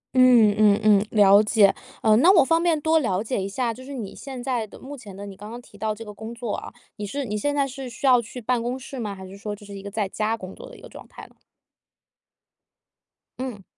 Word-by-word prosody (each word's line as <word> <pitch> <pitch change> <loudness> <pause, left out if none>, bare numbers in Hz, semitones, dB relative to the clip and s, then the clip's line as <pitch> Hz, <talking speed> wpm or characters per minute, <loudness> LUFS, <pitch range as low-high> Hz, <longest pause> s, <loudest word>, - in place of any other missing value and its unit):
嗯 245 -5 +6
嗯 210 -1 +4
嗯， 210 -1 +5
了 200 -1 +6
解。 210 -2 +4 0.3
呃， 215 -1 +5
那 335 +10 +6
我 340 -8 +6
方 330 +3 +2
便 335 -3 +2
多 320 +2 +3
了 200 -8 -1
解 230 -2 -2
一 190 - -3
下， 235 +3 -1
就 255 - -12
是 275 +2 -9
你 220 -6 -6
现 260 -3 -8
在 245 -5 -1
的 - - -14
目 280 +2 -9
前 210 -8 -11
的， 200 - -7
你 200 -1 -9
刚 205 +2 -10
刚 235 +2 -7
提 235 - -18
到 215 +1 -2
这 225 +2 -9
个 210 - -9
工 220 +3 -8
作 235 -3 -4
啊， - - -6 0.3
你 210 - -4
是 275 +7 -4
你 210 -3 -4
现 285 +8 -1
在 280 -1 +1
是 265 -1 -7
需 240 +4 -7
要 250 -2 +6
去 235 +2 -9
办 245 +1 0
公 245 +2 -3
室 265 0 -8
吗？ 210 -4 -4
还 190 - -10
是 190 - -11
说， 205 +1 -5
就 205 0 -15
是 200 - -10
一 195 - -7
个 200 - -7
在 205 0 -2
家 215 +3 -2
工 185 -2 -9
作 - - -11
的 - - -13
一 - - -16
个 - - -11
状 - - -13
态 - - -12
呢？ - - -25 2.0
嗯。 250 -6 -6
225 Hz, 285 characters per minute, -24 LUFS, 205-255 Hz, 2.0 s, 嗯